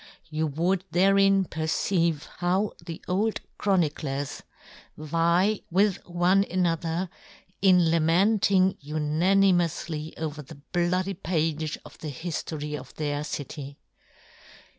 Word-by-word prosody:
You 155 +1 0
would 175 +6 0
therein 195 +1 +4
perceive 160 0 0
how 185 +4 +1
the 165 -2 -8
old 210 +4 0 0.2
chroni 180 -7 +2
clers 140 -2 -4 0.6
vie 170 +6 +1
with 195 +2 +3
one 180 +3 +3
another 170 0 0 0.5
in 180 -4 +5
lament 175 +7 +3
ing 190 0 +3
unanimoufly 165 +1 +1
over 155 -1 -4
this 150 +1 -12
bloody 180 +2 +1
page 160 -4 -1
of 150 - -14
the 155 - -5
hiftory 150 0 -4
of - - -10
their 145 -1 -2
city. 145 -1 -6
170 Hz, 110 wpm, -26 LUFS, 155-185 Hz, 0.6 s, in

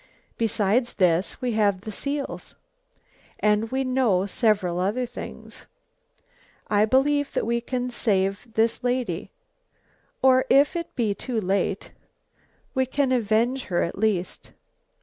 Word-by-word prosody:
Besides 225 +2 +1
this, 180 -1 +1
we 250 - 0
have 205 -4 +1
the 215 - -7
seals, 280 +6 -4 0.8
and 210 +1 +2
we 265 +2 -1
know 250 -8 +2
several 200 -4 +1
other 210 +7 0
things. - - -10 1.0
I 210 0 +4
believe 285 +4 +2
that - - 0
we 235 +1 0
can 250 +1 -3
save 200 -1 0
this 225 +2 +1
lady, 245 -9 -1 0.9
or 260 0 +5
if 280 +5 +4
it 335 0 -5
be 225 -5 +1
too 235 +2 -3
late, 195 0 -1 0.8
we 260 -1 +1
can 270 0 0
avenge 240 +2 +1
her 175 -3 0
at 170 - -3
least." 195 -3 -2
225 Hz, 130 wpm, -24 LUFS, 200-255 Hz, 1.0 s, or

